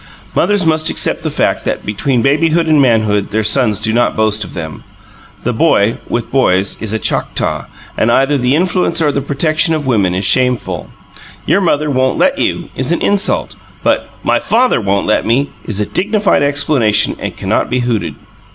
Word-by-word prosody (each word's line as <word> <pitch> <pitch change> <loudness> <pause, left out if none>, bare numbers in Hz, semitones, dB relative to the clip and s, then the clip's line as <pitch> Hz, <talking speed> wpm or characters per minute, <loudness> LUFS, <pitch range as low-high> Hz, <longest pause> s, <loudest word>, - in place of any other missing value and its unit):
Mothers 205 -3 +1
must 155 -1 +2
accept - - 0
the - - -2
fact - - -1
that - - -3
between 115 +4 -1
babyhood 160 +4 +2
and 155 -2 +3
manhood 110 -5 +1
their 110 +1 -1
sons 110 -3 +2
do 110 0 0
not 120 +1 +1
boast 110 -1 +1
of 90 - -10
them. 80 -5 -7 0.6
The - - -1
boy, 100 +3 +2
with 120 - -3
boys, 100 -8 +1
is 110 -2 -3
a 110 - 0
Choctaw; 100 - -2 0.3
and 115 - +1
either 135 +4 +2
the 130 0 +1
influence 180 0 +1
or 150 -3 +2
the 140 - -2
protection 155 +4 +1
of 150 -2 -4
women 100 -8 +1
is 95 +1 -2
shameful. 120 - 0 0.6
"Your 200 - +2
mother 150 -4 0
won't 130 -1 0
let - - +1
you," - - -2
is 130 +4 -2
an 170 - +1
insult. 200 -1 0 0.3
But, - - 0
"My - - +1
father 245 - +1
won't 100 -1 0
let 110 - +1
me," 130 +6 0
is 105 -3 -4
a 105 - 0
dignified 205 - 0
explanation 140 -6 +2
and - - -5
cannot - - -1
be 125 +1 0
hooted. 120 -3 -2
130 Hz, 185 wpm, -14 LUFS, 110-155 Hz, 0.6 s, and